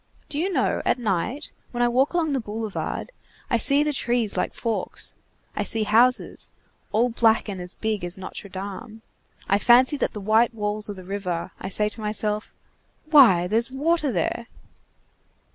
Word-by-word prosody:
Do 290 Hz, -, -2 dB
you 375 Hz, +4 st, 0 dB
know, -, -, +1 dB
at -, -, +2 dB
night, 235 Hz, -, -1 dB, 0.2 s
when 240 Hz, 0 st, -1 dB
I -, -, +4 dB
walk 260 Hz, +7 st, +1 dB
along 320 Hz, -4 st, +1 dB
the 270 Hz, -, +1 dB
boulevard, 220 Hz, -, -4 dB, 0.4 s
I 235 Hz, -, +4 dB
see 280 Hz, +5 st, +3 dB
the 300 Hz, 0 st, -1 dB
trees 240 Hz, -4 st, +1 dB
like -, -, -2 dB
forks, 230 Hz, -2 st, -2 dB, 0.4 s
I -, -, -1 dB
see 225 Hz, -1 st, +1 dB
houses, 235 Hz, +4 st, +2 dB, 0.4 s
all 235 Hz, +3 st, +2 dB
black 225 Hz, -1 st, +2 dB
and 195 Hz, -3 st, -5 dB
as 180 Hz, +1 st, -7 dB
big 215 Hz, -3 st, -2 dB
as 175 Hz, +2 st, -3 dB
Notre 190 Hz, +1 st, -8 dB
Dame, 205 Hz, +4 st, -8 dB, 0.4 s
I 200 Hz, -, +3 dB
fancy 255 Hz, +6 st, +5 dB
that -, -, -1 dB
the 210 Hz, -, -6 dB
white 220 Hz, +3 st, +2 dB
walls 210 Hz, 0 st, -2 dB
are 205 Hz, -, -4 dB
the 185 Hz, -, -10 dB
river, 180 Hz, -2 st, -4 dB
I 190 Hz, -, -4 dB
say 210 Hz, +2 st, +2 dB
to 220 Hz, +1 st, -5 dB
myself: 210 Hz, 0 st, -1 dB, 0.6 s
'Why, 230 Hz, -, +7 dB
there's 225 Hz, +6 st, +1 dB
water 300 Hz, +1 st, +1 dB
there! 230 Hz, +5 st, -2 dB
220 Hz, 175 wpm, -24 LUFS, 205-250 Hz, 0.6 s, Why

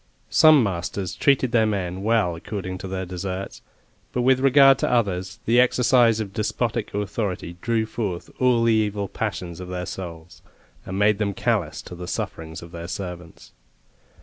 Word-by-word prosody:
Some 155 Hz, -4 st, +7 dB
masters 95 Hz, -1 st, -3 dB
treated 135 Hz, -3 st, +2 dB
their 110 Hz, -2 st, +3 dB
men 95 Hz, -3 st, -2 dB
well 105 Hz, -5 st, +1 dB
according 95 Hz, +1 st, -5 dB
to 95 Hz, -, -6 dB
their 95 Hz, 0 st, -3 dB
deserts; 95 Hz, +1 st, -5 dB, 0.5 s
but 125 Hz, -, -1 dB
with 130 Hz, +1 st, +4 dB
regard 135 Hz, 0 st, +6 dB
to -, -, 0 dB
others, 95 Hz, -6 st, 0 dB
the 120 Hz, +2 st, +4 dB
exercise 125 Hz, -2 st, +4 dB
of 100 Hz, -3 st, -4 dB
despotic 115 Hz, +1 st, -2 dB
authority 100 Hz, -4 st, -3 dB
drew 115 Hz, -1 st, 0 dB
forth 100 Hz, -6 st, -4 dB
all 125 Hz, -2 st, +3 dB
the 115 Hz, -1 st, +4 dB
evil 105 Hz, -2 st, 0 dB
passions 90 Hz, -4 st, -4 dB
of 90 Hz, -, -7 dB
their 90 Hz, 0 st, -4 dB
souls, 85 Hz, -2 st, -8 dB, 0.5 s
and 95 Hz, -, -4 dB
made 105 Hz, 0 st, +3 dB
them 100 Hz, -2 st, -1 dB
callous 100 Hz, -11 st, -1 dB
to -, -, -10 dB
the 90 Hz, 0 st, -7 dB
sufferings 80 Hz, -1 st, -5 dB
of 85 Hz, -, -11 dB
their 85 Hz, -1 st, -7 dB
servants. 90 Hz, -2 st, -7 dB
100 Hz, 165 wpm, -23 LUFS, 90-115 Hz, 0.5 s, Some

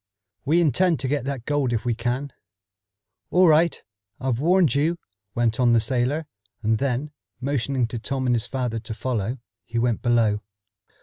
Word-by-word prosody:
"We 165 Hz, +5 st, +3 dB
intend 170 Hz, +1 st, +2 dB
to 130 Hz, -, -1 dB
get 140 Hz, -1 st, -1 dB
that 135 Hz, -4 st, -4 dB
gold 145 Hz, -4 st, 0 dB
if 115 Hz, 0 st, -1 dB
we 120 Hz, -, +1 dB
can." 120 Hz, +4 st, -3 dB, 1.0 s
"All 180 Hz, 0 st, +5 dB
right. 160 Hz, +1 st, +3 dB, 0.4 s
I've 125 Hz, -2 st, -1 dB
warned 170 Hz, -2 st, +3 dB
you," 155 Hz, +5 st, +1 dB, 0.4 s
went 120 Hz, 0 st, +1 dB
on 120 Hz, -2 st, +4 dB
the 115 Hz, -, +5 dB
sailor, 130 Hz, +6 st, 0 dB, 0.4 s
and 110 Hz, 0 st, +2 dB
then, 140 Hz, +2 st, -1 dB, 0.3 s
motioning 130 Hz, -1 st, 0 dB
to 120 Hz, -, -4 dB
Tom 130 Hz, +3 st, -3 dB
and 125 Hz, -, +2 dB
his 115 Hz, +1 st, -2 dB
father 120 Hz, -2 st, -2 dB
to 110 Hz, 0 st, -7 dB
follow, 120 Hz, 0 st, -2 dB, 0.3 s
he 115 Hz, +6 st, -5 dB
went 115 Hz, -1 st, +1 dB
below. 115 Hz, -4 st, +2 dB
125 Hz, 170 wpm, -24 LUFS, 115-145 Hz, 1.0 s, All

